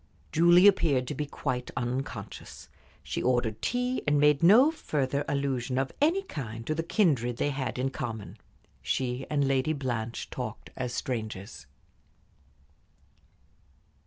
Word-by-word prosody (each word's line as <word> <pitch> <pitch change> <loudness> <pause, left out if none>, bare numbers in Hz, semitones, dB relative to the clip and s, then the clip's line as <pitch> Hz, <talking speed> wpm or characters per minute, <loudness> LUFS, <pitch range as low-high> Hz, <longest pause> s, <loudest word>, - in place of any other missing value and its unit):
Julie 175 +3 +6
appeared 150 -10 +4
to - - -2
be 150 +1 -3
quite 130 -3 -3
unconscious. 125 +2 -5 0.3
She - - -3
ordered 120 -3 0
tea, 250 +1 -1
and 145 0 +3
made 150 -1 +4
no 225 - +7
further 140 - -1
allusion 135 -2 -1
of 135 0 0
any 340 +7 +3
kind 115 - -6
to 155 - 0
the 160 - -1
kindred 145 - +1
they 145 - 0
had 135 -2 -3
in 130 +1 -1
common. 115 -8 -6 0.4
She 130 0 -2
and 145 -2 +1
Lady 135 +3 +1
Blanche 120 -5 -4
talked - - -6
as 125 -1 -3
strangers. 110 - -5
135 Hz, 130 wpm, -28 LUFS, 125-155 Hz, 0.4 s, no